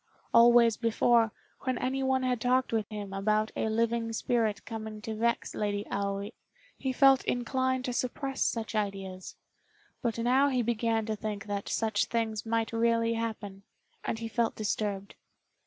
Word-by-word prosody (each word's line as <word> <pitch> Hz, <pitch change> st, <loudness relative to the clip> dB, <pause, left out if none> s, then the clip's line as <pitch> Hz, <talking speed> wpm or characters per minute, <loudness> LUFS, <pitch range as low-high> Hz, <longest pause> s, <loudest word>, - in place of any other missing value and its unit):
Always 235 Hz, -1 st, +6 dB
before, 230 Hz, -1 st, +3 dB, 0.3 s
when 255 Hz, -2 st, -2 dB
anyone 265 Hz, +1 st, 0 dB
had 250 Hz, -3 st, 0 dB
talked 250 Hz, 0 st, +2 dB
with 220 Hz, -2 st, 0 dB
him 205 Hz, -3 st, -6 dB
about 215 Hz, +2 st, +1 dB
a 220 Hz, -, 0 dB
living 230 Hz, +1 st, 0 dB
spirit 220 Hz, -3 st, 0 dB
coming 220 Hz, -1 st, -6 dB
to 220 Hz, -, -4 dB
vex 235 Hz, +2 st, 0 dB
Lady 205 Hz, 0 st, -2 dB
Aoi, 200 Hz, +1 st, -2 dB, 0.4 s
he 265 Hz, -, -2 dB
felt 270 Hz, 0 st, +5 dB
inclined 260 Hz, +1 st, 0 dB
to 250 Hz, -, -2 dB
suppress 265 Hz, +2 st, -3 dB
such 220 Hz, -4 st, 0 dB
ideas; 195 Hz, -3 st, -4 dB, 0.7 s
but 235 Hz, -3 st, -1 dB
now 255 Hz, +4 st, +3 dB
he 255 Hz, -3 st, +1 dB
began 225 Hz, -1 st, 0 dB
to 220 Hz, 0 st, -2 dB
think 210 Hz, -1 st, -5 dB
that 200 Hz, -1 st, -4 dB
such 220 Hz, -2 st, +1 dB
things 225 Hz, -2 st, -2 dB
might 225 Hz, 0 st, 0 dB
really 230 Hz, 0 st, +2 dB
happen, 220 Hz, -4 st, -4 dB, 0.4 s
and -, -, -2 dB
he 230 Hz, 0 st, -4 dB
felt 230 Hz, 0 st, 0 dB
disturbed. 205 Hz, -2 st, -2 dB
225 Hz, 155 wpm, -29 LUFS, 215-240 Hz, 0.7 s, Always